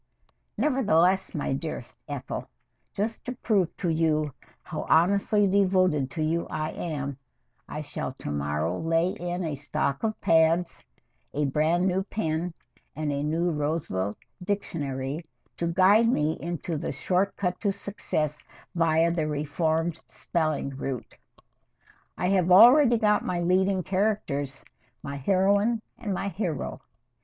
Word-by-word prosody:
Nevertheless, 195 Hz, -, +2 dB
my 145 Hz, -, -1 dB
dearest 135 Hz, -3 st, -5 dB
Ethel, 140 Hz, -3 st, -5 dB, 0.5 s
just 220 Hz, +3 st, -2 dB
to 250 Hz, -, -3 dB
prove 210 Hz, -8 st, 0 dB
to 180 Hz, -, -1 dB
you 155 Hz, -3 st, +1 dB, 0.3 s
how -, -, -5 dB
honestly 200 Hz, +5 st, +4 dB
devoted 185 Hz, -7 st, +3 dB
to 155 Hz, +3 st, -3 dB
you 165 Hz, +2 st, 0 dB
I 155 Hz, 0 st, -2 dB
am, 140 Hz, -5 st, -4 dB, 0.5 s
I -, -, -4 dB
shall -, -, -5 dB
to -, -, -6 dB
morrow 75 Hz, +4 st, -1 dB
lay 165 Hz, +2 st, +2 dB
in 175 Hz, 0 st, -3 dB
a 160 Hz, -3 st, -2 dB
stock 140 Hz, -1 st, -2 dB
of 220 Hz, -1 st, -2 dB
pads, 165 Hz, +2 st, +2 dB, 0.5 s
a 150 Hz, +1 st, +1 dB
brand 155 Hz, +6 st, +2 dB
new 190 Hz, +1 st, +1 dB
pen, 170 Hz, -4 st, -2 dB, 0.4 s
and 155 Hz, -1 st, -2 dB
a 140 Hz, 0 st, -1 dB
new 165 Hz, +4 st, 0 dB
Roosevelt 145 Hz, -, -2 dB, 0.3 s
Dictionary 150 Hz, -7 st, -3 dB, 0.3 s
to 170 Hz, -, -1 dB
guide 195 Hz, +6 st, +5 dB
me 155 Hz, -7 st, +1 dB
into 170 Hz, -1 st, -3 dB
the 165 Hz, -, -3 dB
short 185 Hz, +7 st, 0 dB
cut 180 Hz, -2 st, -2 dB
to 205 Hz, -, +1 dB
success 155 Hz, -7 st, -3 dB, 0.3 s
via 165 Hz, 0 st, +3 dB
the 160 Hz, -3 st, -1 dB
Reformed 160 Hz, +2 st, -1 dB
Spelling 155 Hz, -5 st, -1 dB
Route. 135 Hz, -2 st, -5 dB, 1.0 s
I 180 Hz, -, 0 dB
have 185 Hz, -2 st, +2 dB
already 240 Hz, +6 st, +8 dB
got 210 Hz, -2 st, +2 dB
my 175 Hz, -1 st, -1 dB
leading 185 Hz, +2 st, +2 dB
characters 185 Hz, -8 st, -1 dB, 0.4 s
my 140 Hz, 0 st, -5 dB
heroine 200 Hz, -, +2 dB, 0.2 s
and 215 Hz, -4 st, -4 dB
my 195 Hz, +1 st, -1 dB
hero. 175 Hz, -6 st, -3 dB
170 Hz, 135 wpm, -27 LUFS, 150-195 Hz, 1.0 s, already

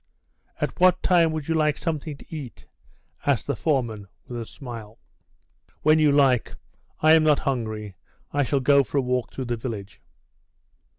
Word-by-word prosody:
"At -, -, -3 dB
what 185 Hz, 0 st, +4 dB
time 170 Hz, -3 st, +4 dB
would 155 Hz, -2 st, -4 dB
you 165 Hz, -, +1 dB
like 155 Hz, -2 st, +2 dB
something 155 Hz, -3 st, -3 dB
to 160 Hz, -, -11 dB
eat?" 135 Hz, -8 st, -8 dB, 0.6 s
asked 140 Hz, -5 st, +1 dB
the 140 Hz, -, -1 dB
foreman, 115 Hz, -7 st, -1 dB, 0.2 s
with 120 Hz, -1 st, -5 dB
a -, -, -6 dB
smile. 115 Hz, -4 st, -9 dB, 0.9 s
"When 155 Hz, +1 st, +5 dB
you 150 Hz, -2 st, +4 dB
like; 135 Hz, -4 st, +3 dB, 0.5 s
I 155 Hz, +1 st, +6 dB
am 160 Hz, -1 st, +6 dB
not 150 Hz, -2 st, +3 dB
hungry. 110 Hz, -7 st, -3 dB, 0.4 s
I 145 Hz, -, +2 dB
shall 140 Hz, 0 st, +1 dB
go 140 Hz, +2 st, +5 dB
for 140 Hz, -, -4 dB
a -, -, +4 dB
walk 125 Hz, -1 st, -1 dB
through 130 Hz, -, -5 dB
the 120 Hz, 0 st, -2 dB
village." 110 Hz, -5 st, -7 dB
140 Hz, 170 wpm, -24 LUFS, 120-155 Hz, 0.9 s, I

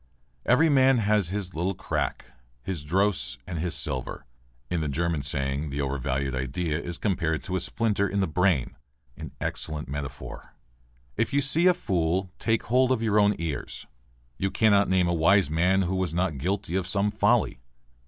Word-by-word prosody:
"Every 135 Hz, +7 st, +5 dB
man 135 Hz, -3 st, +5 dB
has 105 Hz, -3 st, +2 dB
his 95 Hz, -1 st, -4 dB
little 90 Hz, +4 st, -1 dB
crack, 95 Hz, -, -3 dB, 0.4 s
his 90 Hz, -4 st, -4 dB
dross 95 Hz, +5 st, 0 dB
and 85 Hz, -3 st, -5 dB
his 85 Hz, +1 st, -2 dB
sliver." 65 Hz, 0 st, -3 dB, 0.4 s
(In 85 Hz, +5 st, -1 dB
the 75 Hz, -, -1 dB
German 80 Hz, +1 st, -1 dB
saying 70 Hz, +2 st, -1 dB
the 70 Hz, +1 st, -4 dB
overvalued 65 Hz, 0 st, -2 dB
idea 75 Hz, +5 st, -2 dB
is 85 Hz, -1 st, -4 dB
compared 85 Hz, -6 st, -1 dB
to 95 Hz, -, -3 dB
a -, -, +1 dB
splinter 100 Hz, +2 st, 0 dB
in 100 Hz, -, -1 dB
the 95 Hz, -, +3 dB
brain. 80 Hz, -6 st, +1 dB, 0.4 s
An -, -, -8 dB
excellent 75 Hz, -1 st, -3 dB
metaphor!) 70 Hz, -2 st, -7 dB, 0.6 s
"If 115 Hz, +5 st, 0 dB
you 140 Hz, -, +3 dB
see 155 Hz, +6 st, +3 dB
a 180 Hz, -, +5 dB
fool 95 Hz, -, -1 dB
take 110 Hz, -1 st, +1 dB
hold 130 Hz, +2 st, +2 dB
of 120 Hz, -3 st, +1 dB
your 105 Hz, -1 st, +3 dB
own 105 Hz, 0 st, +4 dB
ears." 80 Hz, -4 st, -4 dB, 0.5 s
"You 95 Hz, -, 0 dB
cannot 100 Hz, -1 st, +3 dB
name 95 Hz, -1 st, +3 dB
a 85 Hz, -, +1 dB
wise 85 Hz, +2 st, +4 dB
man 90 Hz, +4 st, +3 dB
who 90 Hz, +1 st, -1 dB
was 95 Hz, -3 st, -1 dB
not 85 Hz, -6 st, 0 dB
guilty 95 Hz, +3 st, -2 dB
of 95 Hz, -2 st, -1 dB
some 100 Hz, +2 st, +1 dB
folly." -, -, +2 dB
90 Hz, 175 wpm, -26 LUFS, 80-105 Hz, 0.6 s, Every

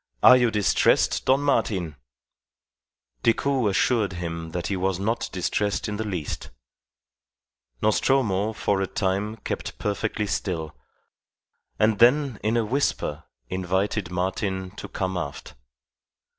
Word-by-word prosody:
Are 125 Hz, -, +10 dB
you 120 Hz, -2 st, +4 dB
distressed, 105 Hz, -3 st, +2 dB
Don 135 Hz, +2 st, +4 dB
Martin?" 100 Hz, -, 0 dB, 1.3 s
Decoud 130 Hz, -1 st, +2 dB
assured 105 Hz, 0 st, +1 dB
him 85 Hz, -2 st, -5 dB
that 85 Hz, +1 st, -4 dB
he 100 Hz, -, -1 dB
was 95 Hz, 0 st, 0 dB
not 115 Hz, +4 st, -1 dB
distressed 100 Hz, +4 st, -1 dB
in 105 Hz, -1 st, -3 dB
the 110 Hz, -, -2 dB
least. 90 Hz, -8 st, -4 dB, 1.3 s
Nostromo 110 Hz, -2 st, +2 dB
for 100 Hz, -2 st, 0 dB
a 95 Hz, -, 0 dB
time 100 Hz, +3 st, -1 dB
kept -, -, -5 dB
perfectly 105 Hz, +1 st, -2 dB
still, 85 Hz, -, -3 dB, 1.0 s
and 110 Hz, 0 st, +2 dB
then 125 Hz, 0 st, +4 dB
in 110 Hz, +2 st, +1 dB
a 115 Hz, -, +1 dB
whisper 105 Hz, -, -1 dB, 0.2 s
invited 95 Hz, -, -1 dB
Martin 95 Hz, +1 st, -2 dB
to 100 Hz, -, -8 dB
come 95 Hz, -1 st, -3 dB
aft. 70 Hz, -5 st, -6 dB
100 Hz, 120 wpm, -25 LUFS, 95-110 Hz, 1.3 s, Are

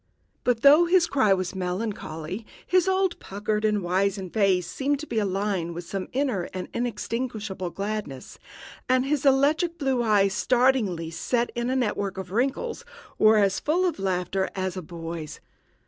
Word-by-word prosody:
But, 245 Hz, -2 st, +1 dB
though 295 Hz, +5 st, +8 dB
his 350 Hz, 0 st, +4 dB
cry 265 Hz, -, +2 dB
was 185 Hz, -1 st, +1 dB
melancholy, 185 Hz, -1 st, -4 dB, 0.2 s
his 365 Hz, 0 st, +3 dB
old 380 Hz, -1 st, +1 dB
puckered 210 Hz, +2 st, -3 dB
and 210 Hz, -2 st, +1 dB
wizened 190 Hz, +1 st, -1 dB
face 195 Hz, -4 st, +2 dB
seemed 280 Hz, -, -1 dB
to -, -, -6 dB
be 225 Hz, -, -1 dB
alight 195 Hz, -4 st, -1 dB
with 175 Hz, -, -5 dB
some 190 Hz, +2 st, -5 dB
inner 250 Hz, -9 st, -1 dB
and 185 Hz, -, -4 dB
inextinguishable 220 Hz, -4 st, -3 dB
gladness, 195 Hz, -7 st, -5 dB, 0.5 s
and 255 Hz, 0 st, +3 dB
his 285 Hz, 0 st, +1 dB
electrical 300 Hz, +6 st, +3 dB
blue 270 Hz, -5 st, 0 dB
eyes, 205 Hz, -4 st, +3 dB
startlingly 235 Hz, -10 st, +1 dB
set 240 Hz, +7 st, -1 dB
in 240 Hz, +1 st, -2 dB
a 260 Hz, -, 0 dB
network 205 Hz, -6 st, -1 dB
of 190 Hz, -1 st, -6 dB
wrinkles, 275 Hz, -, -1 dB, 0.4 s
were 215 Hz, 0 st, +6 dB
as 200 Hz, -2 st, +2 dB
full 345 Hz, +5 st, +1 dB
of 345 Hz, -, -1 dB
laughter 190 Hz, 0 st, -1 dB
as 190 Hz, -1 st, -2 dB
a 185 Hz, -, -4 dB
boy's. 165 Hz, -1 st, -7 dB
210 Hz, 160 wpm, -25 LUFS, 185-260 Hz, 0.5 s, though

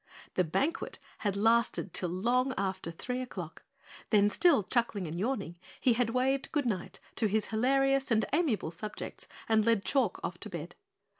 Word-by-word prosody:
The 185 Hz, -, +3 dB
banquet 275 Hz, -, -1 dB, 0.2 s
had 200 Hz, -2 st, -1 dB
lasted 225 Hz, -3 st, +2 dB
till 180 Hz, -, -1 dB
long 245 Hz, +9 st, +1 dB
after 190 Hz, -3 st, -2 dB
three 250 Hz, +10 st, -4 dB
o'clock, 255 Hz, -, -7 dB, 0.5 s
then 205 Hz, -1 st, +4 dB
still 295 Hz, -, +4 dB
chuckling 225 Hz, -3 st, 0 dB
and 160 Hz, 0 st, -5 dB
yawning, 195 Hz, -7 st, -2 dB, 0.2 s
he 250 Hz, -, +4 dB
had 235 Hz, 0 st, +1 dB
waved 260 Hz, +3 st, +1 dB
goodnight 240 Hz, -, -1 dB, 0.2 s
to 220 Hz, -, +3 dB
his 210 Hz, +1 st, +1 dB
hilarious 270 Hz, +4 st, +2 dB
and 220 Hz, -2 st, +3 dB
amiable 265 Hz, -, +1 dB
subjects 210 Hz, +5 st, -7 dB, 0.2 s
and 220 Hz, -1 st, +4 dB
led 225 Hz, -3 st, +2 dB
Chalk 260 Hz, -9 st, +1 dB
off 175 Hz, -, -4 dB
to 215 Hz, -, -6 dB
bed. 170 Hz, -2 st, -6 dB
225 Hz, 160 wpm, -31 LUFS, 195-255 Hz, 0.5 s, then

